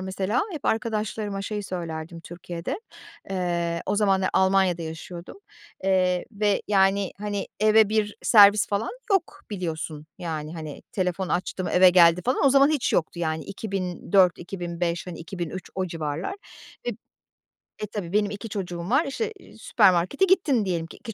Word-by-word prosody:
mesela, 190 +5 -1
hep 310 - -7
arkadaşlarıma 215 -2 -1
şeyi 210 0 -3
söylerdim 165 -2 -6
Türkiye'de. 175 - -6 0.5
Eee, 170 -2 -1
o 205 +2 0
zamanlar 195 -2 +2
Almanya'da 190 -2 +3
yaşıyordum, 170 - -8 0.5
eee, 185 -2 +2
ve 205 -1 +1
yani, 195 -1 +3
hani, 205 -1 -3
eve 215 -1 +5
bir 210 -1 0
servis 205 -2 +7
falan 205 +2 -1 0.2
yok, 385 -4 0
biliyorsun, 160 -5 -4
yani, 160 -2 -5
hani, 155 -3 -7
"Telefon 185 -1 -1
açtım, 180 +1 -2
eve 185 0 +6
geldi." 175 -1 +6
falan, 255 +3 +2
o - - +6
zaman 275 +1 +6
hiç 270 -8 0
yoktu 170 +1 0
yani, 160 -2 -2
2004-2005, 180 -2 -1
hani, 175 -2 -7
2003 175 +1 -6
o 190 -1 -1
civarlar 160 - -4 0.5
ve - - +1 0.9
E, - - -2
tabii, 200 -3 -6
benim 210 -1 +2
2 210 +2 -7
çocuğum 180 -3 -5
var, 275 +6 +3
işte, 440 +11 -3
eee, - - -17
süpermarkete 200 - +3
gittin 320 - +2
diyelim 170 -3 -2
ki - - -13
2 225 -2 -8
190 Hz, 150 wpm, -25 LUFS, 170-210 Hz, 0.9 s, servis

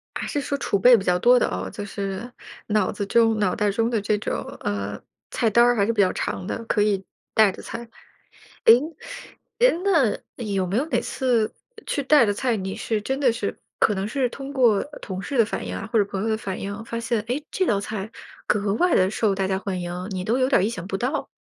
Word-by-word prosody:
还 - - -3
是 290 - -1
说 280 0 -2
储 200 - 0
备 245 +4 +7
比 195 - -4
较 180 0 +2
多 245 +5 +5
的 - - +2
哦， 90 +1 -4
就 205 - -6
是， 200 +4 -5 0.4
脑 210 -2 +1
子 205 -1 -3
中 225 0 +3
脑 190 -3 +1
袋 210 -3 +1
中 230 +3 +1
的 225 -3 0
这 210 +1 +1
种 - - -2 0.2
呃 100 0 -3 0.3
菜 230 - +1
单 235 +3 +5
儿 245 0 +3
还 200 -1 +2
是 230 - +1
比 210 - 0
较 185 - +4
长 180 - -3
的， 230 - -4
可 215 -2 +1
以 200 -2 +1 0.3
带 215 -4 +5
的 - - -11
菜。 - - -6 0.9
哎 225 - +10 0.8
哎 - - +6
那 320 - +3 0.3
有 195 -3 -1
没 195 +4 -2
有 270 - +2
哪 - - 0
次， 240 -5 0 0.3
去 285 - -1
带 270 -2 +5
的 205 - +2
菜， 240 +1 0
你 190 -1 -4
是 220 -2 -1
真 265 +6 -2
的 250 -4 +4
是 210 -3 -4 0.2
可 210 - +3
能 195 +1 -2
是 255 +2 0
通 275 +3 -8
过 235 -7 +3 0.2
同 190 -1 -5
事 270 +3 -3
的 230 - +6
反 95 - -4
应 90 - -4
啊 - - -6
或 225 - +4
者 205 - +4
朋 195 0 -4
友 225 - -1
的 220 - +1
反 195 -3 -5
应 200 +1 -4
哦， 215 - -7
发 230 0 -4
现， 230 -2 0
诶， 255 +7 -3
这 375 - 0
道 200 -2 +2
菜 210 0 -5 0.4
格 205 -1 +1
外 355 +8 +2
地 185 +1 +3
受 215 -2 +1
大 190 -1 -1
家 190 0 0
欢 190 -2 -4
迎， 175 +2 -5
你 185 -1 -4
都 235 +4 +1
有 255 0 +2
点 270 - +4
儿 - - +2
意 210 - +1
想 185 -6 -6
不 195 - -2
到？ 260 +8 -2
215 Hz, 265 characters per minute, -24 LUFS, 195-240 Hz, 0.9 s, 哎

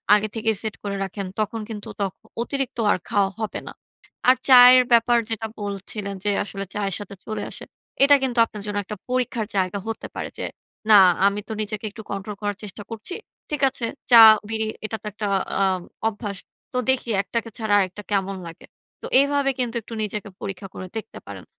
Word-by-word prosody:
আগে 210 +1 +1
থেকেই 220 0 0
সেট 220 -2 -4
করে 200 -1 -3
রাখেন, 195 +1 -5
তখন 215 +1 -1
কিন্তু 210 -2 -6
ত - - -2 0.4
অতিরিক্ত 270 +1 -2
আর - - +2
খাওয়া 200 -3 +2
হবে 220 -2 -3
না। - - -7 0.6
আর 255 - +7
চায়ের 250 0 +9
ব্যাপার 235 +1 +5
যেটা 225 0 -2
বলছিলেন 200 0 -5
যে 205 - +1
আসলে 195 -1 -6
চায়ের 200 -3 -1
সাথে 200 -1 -8
চলে 215 - -4
আসে। - - -8 0.4
এটা 285 +1 +8
কিন্তু 250 -2 -1
আপনার 210 -2 -9
জন্য 205 -1 -3
একটা 210 - -6
পরীক্ষার 245 -3 -1
জায়গা 185 +1 0
হতে 225 - -4
পারে - - -4
যে, - - -3 0.4
"না 210 -2 +9 0.3
আমি 200 +1 0
তো - - -7
নিজেকে 215 0 -4
একটু 220 - -9
কন্ট্রোল 200 +1 -4
করার 205 -1 -2
চেষ্টা 205 0 -8
করছি। 225 - -6 0.3
ঠিক 295 -2 -3
আছে 250 -3 -4 0.3
চা-বিড়ি 220 -1 +7 0.2
এটা 220 +1 -3
তো - - -17
একটা 210 +1 -5 0.4
আ - - +5 0.4
অভ্যাস। 205 -2 -4 0.4
তো - - -1
দেখি 260 -2 +1
একটাকে 230 +3 -3
ছাড়া 220 -2 0
আরেকটা 195 +2 -2
কেমন 195 -1 0
লাগে?" 165 - -11 0.4
তো - - -7 0.2
এভাবে 280 -1 +2
কিন্তু 240 -1 -1
একটু 230 - -11
নিজেকে 210 0 -4
পরীক্ষা 195 0 -5
করে 185 - -7
দেখতে 220 - -7
পারেন। - - -9
215 Hz, 185 wpm, -23 LUFS, 200-230 Hz, 0.6 s, চায়ের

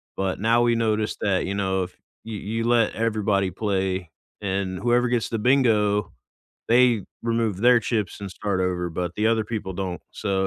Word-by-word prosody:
but 95 -1 -2
now 115 +3 +3
we 120 -1 +3
noticed 110 -2 0
that, 95 -2 +1
you 100 - -2
know, 95 -1 0
if 90 0 -9 0.3
you 110 -2 -6
you 115 +3 -3
let 120 -2 +3
everybody 105 -4 +1
play 95 -3 -1 0.3
and 95 -2 -2
whoever 120 +3 +2
gets 120 -2 0
the 115 - -2
bingo, 105 - +2 0.6
they 120 -2 +4 0.2
remove 115 -4 0
their 120 +3 +6
chips 105 -4 -2
and 100 - -5
start 100 0 -2
over, 90 -1 -1
but 90 +1 -3
the 105 +1 +1
other 115 -1 +2
people 105 -3 -4
don't. 90 -1 -4
So, 95 -2 -1
105 Hz, 180 wpm, -24 LUFS, 95-115 Hz, 0.6 s, their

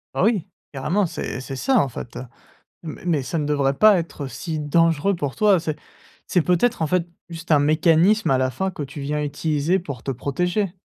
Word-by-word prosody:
Oh - - +1
oui 215 -7 +1 0.3
carrément, 165 +9 0
c'est 160 - -5
c'est 135 +1 -6
ça 260 - +2
en 140 - +2
fait, 120 0 -8
heu, 125 - -6 0.6
mais 160 -3 -8
mais 160 -6 +1
ça 135 +6 -4
ne 150 - -1
devrait 140 -2 +1
pas 210 +2 +6
être 160 -4 -5
si 155 +5 -5
dangereux 165 +4 +2
pour 145 -6 -4
toi. 205 -5 +4
C'est 155 -2 -3 0.5
c'est 180 - +2
peut-être 180 +5 +1
en 160 - +1
fait, 175 +1 0 0.2
juste 165 0 -9
un 150 - +6
mécanisme 165 +7 +3
à 130 - +3
la 130 0 +1
fin 190 +9 -2
que 155 - -6
tu 140 +1 -7
viens 150 +2 -2
utiliser 150 +4 0
pour 140 -9 -7
te 135 - -3
protéger 180 - -1
160 Hz, 210 wpm, -22 LUFS, 140-180 Hz, 0.6 s, pas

